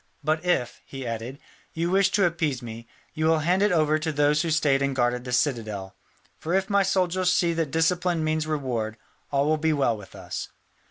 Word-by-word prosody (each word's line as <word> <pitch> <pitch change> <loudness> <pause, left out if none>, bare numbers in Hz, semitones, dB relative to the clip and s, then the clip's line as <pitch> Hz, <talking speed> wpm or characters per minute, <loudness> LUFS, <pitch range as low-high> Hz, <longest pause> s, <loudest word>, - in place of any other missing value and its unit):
"But 155 +1 0
if," 175 -10 0
he 135 -1 -7
added, 115 +3 -5 0.4
"you 170 +2 -1
wish 195 0 +4
to 200 -2 +4
appease 160 -7 -1
me, 115 0 -8 0.3
you 155 0 0
will 160 0 +4
hand 180 +3 +2
it 205 0 +3
over 155 -2 +2
to 160 +1 -2
those 145 +1 +2
who 165 - -1
stayed 150 -4 +2
and 140 -1 0
guarded 125 0 0
the 125 - -5
citadel. 110 -8 -1 0.4
For 170 +3 -1
if 195 +2 0
my 200 0 +4
soldiers 185 -1 +1
see 175 -2 +2
that 165 -3 -1
discipline 170 +2 +1
means 155 0 0
reward, 125 -8 -2 0.3
all 140 0 +1
will 155 +1 +2
be 160 +1 +1
well 135 -6 +2
with 100 -3 -12
us." - - -6
155 Hz, 205 wpm, -25 LUFS, 130-170 Hz, 0.4 s, wish